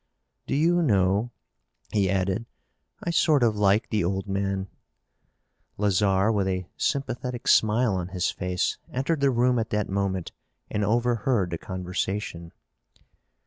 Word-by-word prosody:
Do - - -1
you 170 +4 +3
know," 100 - +2 0.6
he 100 -3 +2
added, 95 +4 0 0.6
"I 170 - -1
sort 155 -5 +3
of 110 -2 +3
like 105 +1 +2
the 105 -3 +1
old 95 +3 -2
man." 95 0 -1 1.1
Lazarre, 100 0 +2
with 100 -3 +1
a 95 -1 -1
sympathetic 125 -2 -2
smile 110 +1 +4
on 90 -2 -2
his 90 -1 -1
face, 90 -1 -2
entered 140 +5 -1
the 140 0 +3
room 125 0 +2
at 115 - -2
that 105 -1 -1
moment 95 -2 -2 0.4
and 105 - 0
overheard 115 -2 +1
the 85 - -3
conversation. 90 -1 -4
105 Hz, 135 wpm, -26 LUFS, 95-120 Hz, 1.1 s, smile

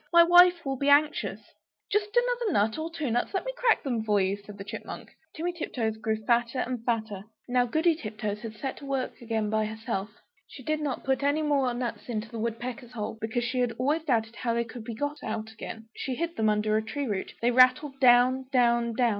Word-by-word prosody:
My 340 -1 +8
wife 350 0 +6
will 270 -1 -2
be 280 +2 +1
anxious!" 295 +1 +3 0.5
"Just 415 +2 0
another 485 -4 +1
nut 215 +6 +1
or 320 +1 -3
two 310 -6 -3
nuts; 245 - -1
let 380 - -1
me - - -3
crack - - +2
them 240 -5 -1
for 210 -2 +2
you," 190 +1 +1
said 205 0 -12
the 195 - -6
Chipmunk. 200 - -8 0.2
Timmy 345 +2 -2
Tiptoes 230 -9 -3
grew 220 0 -1
fatter 235 +2 +2
and 250 -2 -2
fatter! 220 -4 -2 0.2
Now 245 0 +2
Goody 320 +7 +3
Tiptoes 215 -6 -5
had 225 -2 -7
set 265 +5 -4
to 285 - -10
work 270 -2 -3
again 220 -2 -1
by 220 0 +1
herself. 220 -2 -4 0.4
She 260 - -12
did 310 +3 -1
not 285 -4 -3
put 265 0 0
any 285 +2 +1
more 280 -4 +2
nuts 245 0 -4
into 220 -1 -3
the 230 - -6
woodpecker's 240 +2 -4
hole, 220 -1 -5
because 225 +2 -1
she 250 +2 -1
had 245 -2 +1
always 295 +6 +1
doubted 230 -6 0
how 235 -2 -1
they 235 - +1
could 230 0 -9
be 230 - -5
got 290 +4 -3
out 220 0 -4
again. 225 0 -8
She 260 - -3
hid 335 +4 -3
them 220 -1 +2
under 215 0 +1
a 215 - +2
tree 280 +6 -3
root; 205 -6 -3
they 240 +1 +2
rattled 255 +3 +4
down, 255 +1 +5
down, 235 -2 +3
down. 240 +1 +2
245 Hz, 220 wpm, -28 LUFS, 220-285 Hz, 0.5 s, My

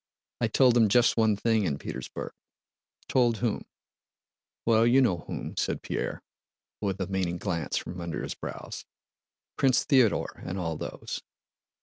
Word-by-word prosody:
"I 115 - +2
told 125 +2 +5
them 115 -3 +5
just 120 +4 +4
one 110 -2 +3
thing 110 +1 +2
in 75 -5 0
Petersburg." - - -6 0.8
"Told 120 -3 +3
whom?" 115 -2 -1 1.0
"Well, 115 0 +5
you 125 +3 +6
know 110 -10 +3
whom," - - -5
said - - -1
Pierre, - - -3 0.6
with 100 -2 -1
a 95 - 0
meaning 90 -2 -1
glance 85 -6 -2
from 90 0 -5
under 85 -1 -4
his - - -3
brows. - - -7 0.7
"Prince 130 -2 +3
Theodore 130 -6 +2
and 90 - -4
all 80 -3 -2
those. - - -5
110 Hz, 145 wpm, -28 LUFS, 90-120 Hz, 1.0 s, you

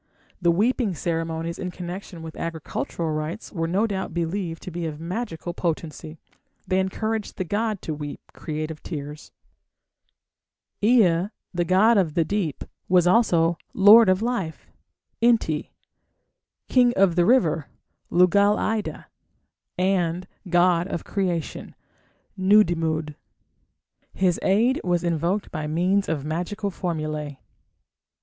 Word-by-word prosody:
The 175 - +3
weeping 210 +2 +1
ceremonies 165 0 -3
in 180 - -3
connection 180 -1 -7
with 160 -1 -8
agricultural 165 0 -4
rites 155 +7 -4
were 165 -3 -2
no 195 +6 +1
doubt 190 -5 -4
believed 170 0 -3
to 185 - -7
be 170 0 -3
of 150 -1 -6
magical 175 -1 -4
potency; 160 -2 -4 0.5
they 185 0 +2
encouraged 215 +3 -2
the 185 - -1
god 210 +2 -2
to 160 - -3
weep 145 -1 -6
creative 155 0 -5
tears. 150 -1 -7 1.5
Ea, 200 -6 +4 0.3
the 175 -1 0
god 205 +5 +5
of 165 -6 0
the 165 - +2
deep, 180 -5 -2 0.3
was 180 -1 +5
also 175 -5 +3 0.2
"lord 210 +2 +8
of 185 +3 +2
life" 210 -10 -3 0.5
(Enti), 225 -10 +2 1.0
"king 245 -2 +4
of 190 -3 +3
the 175 - +4
river" 170 - +3 0.4
(Lugal 200 +4 +4
ida), 215 -1 -2 0.7
and 180 -1 0 0.2
god 175 0 +3
of 170 - -4
creation 180 -6 -3 0.6
(Nudimmud). 165 -6 +2 1.0
His 180 -2 +1
aid 230 +7 +2
was 175 -1 0
invoked 170 +4 -1
by 155 -2 -4
means 180 +6 +1
of 150 -3 -2
magical 180 +6 -3
formulae. 155 -5 -4
175 Hz, 120 wpm, -24 LUFS, 165-200 Hz, 1.5 s, lord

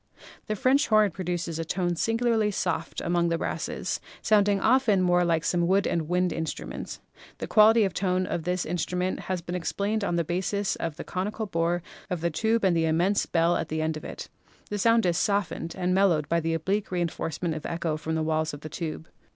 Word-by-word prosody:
The 215 - -1
French 265 +7 +3
horn 215 -2 +4
produces 175 -2 -3
a - - -1
tone 175 +1 -1
singularly 225 +2 +1
soft 170 -5 -2
among 170 0 +1
the 165 - +1
brasses, - - -3 0.2
sounding 205 -2 +3
often 225 -3 +3
more 175 0 +3
like 165 -2 +1
some 175 0 +1
wood 195 +2 +3
wind 175 +2 0
instrument. 160 -1 -5 0.4
The - - -4
quality 220 +1 +6
of 195 - 0
tone 185 -1 0
of 175 - -2
this 180 +2 -1
instrument 180 +2 -2
has 185 -2 -2
been 175 - -5
explained 200 +4 -1
on 175 -3 0
the 170 - +1
basis 190 +4 -1
of 165 -3 -3
the - - -6
conical 210 +4 -3
bore 170 -2 0 0.3
of 180 -3 -2
the 170 0 0
tube 220 +7 +1
and 185 -3 +3
the 165 -1 +2
immense 175 +6 +2
bell 165 +1 +2
at - - -2
the 155 0 -1
end 160 0 -1
of 155 - -7
it. - - -7 0.4
The 205 - -2
sound 230 +1 +4
is 175 -2 +2
soft 200 -3 +1
ened 165 - -6
and 180 0 0
mellowed 180 -6 +3
by 170 +3 +2
the 165 0 -1
oblique 195 +6 -1
reinforcement 170 -1 -2
of 155 - -5
echo 165 -2 -2
from 160 +1 -3
the 160 - 0
walls 155 -1 0
of 145 - -12
the 155 - -7
tube. 160 -1 -5
175 Hz, 210 wpm, -27 LUFS, 165-200 Hz, 0.4 s, quality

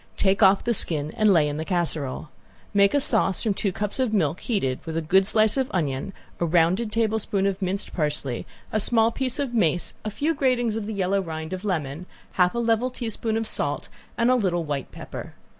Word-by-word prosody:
Take 195 +1 +2
off 195 -1 +5
the 235 - +1
skin 155 -7 +2
and 215 -3 +4
lay 160 -5 +4
in 145 0 -3
the 160 - -2
casserole. 160 -5 -2 0.4
Make 200 +4 +4
a - - +5
sauce 220 - +1
from 215 - +1
two 195 0 -1
cups 210 +6 -3
of 245 -4 +1
milk 165 -3 +1
heated, 135 - -1
with 160 0 -4
a - - 0
good 190 +5 +3
slice 215 +2 +3
of 265 -1 0
onion, 145 -1 -2 0.3
a 170 - +1
rounding 175 +7 +2
tablespoon 215 -3 0
of 200 0 -1
minced 190 +2 -2
parsley, 150 -6 -2 0.2
a 215 - +1
small 225 +1 +3
piece 255 0 -2
of 275 -4 -2
mace, 175 -6 +1
a 215 - -2
few 285 +10 -1
gratings 250 -6 +1
of 220 -2 -3
the 220 - -4
yellow 195 0 +1
rind 160 -1 -5
of 185 +1 -5
lemon, 165 -3 -3 0.2
half 180 +3 +2
a - - -2
level 235 +1 +1
teaspoon 225 -2 -3
of 225 -1 -2
salt, 145 -6 -2 0.3
and 235 +2 +3
a - - +5
little 180 -7 0
white 145 -3 -4
pepper. - - -8
195 Hz, 210 wpm, -24 LUFS, 165-225 Hz, 0.4 s, off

